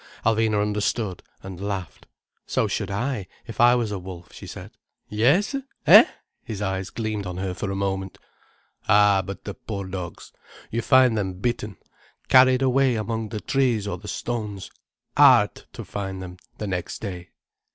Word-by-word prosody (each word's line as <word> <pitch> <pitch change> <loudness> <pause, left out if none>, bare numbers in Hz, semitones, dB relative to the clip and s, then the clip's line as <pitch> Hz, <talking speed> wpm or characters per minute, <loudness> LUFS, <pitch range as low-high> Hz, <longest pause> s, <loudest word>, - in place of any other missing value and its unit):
Alvina 110 -1 +2
understood, 105 -1 -1 0.2
and 95 -1 -8
laughed. 100 -4 -5 0.4
"So - - +1
should - - -2
I, 105 0 -2 0.2
if 115 -1 -4
I 120 +1 +7
was 115 -4 -1
a 100 - -3
wolf," 90 -3 -10
she - - -10
said. - - -9 0.4
"Yes—eh?" 185 - +5 0.4
His 110 -4 -6
eyes 95 -2 -2
gleamed 110 -3 -3
on 90 0 -5
her 95 -1 -2
for 100 +2 -4
a 95 - -2
moment. 95 -1 -2 0.7
"Ah 100 -1 +5
but, 95 +1 -7
the 100 - -5
poor 100 -2 -6
dogs! 90 -2 -7 0.4
You 115 - -1
find 130 -2 +5
them 95 -3 -1
bitten—carried 120 +5 +1
away 130 -1 +3
among 110 0 -3
the 105 -1 -5
trees 125 -6 +1
or - - -4
the 105 - -11
stones, 105 -3 -4 0.4
hard - - +6 0.2
to - - -8
find 95 -2 -5
them, 90 -1 -8
poor - - -28
things, - - -43
the 105 - -4
next 90 -2 -3
day." 90 -4 -6
105 Hz, 160 wpm, -24 LUFS, 95-115 Hz, 0.7 s, I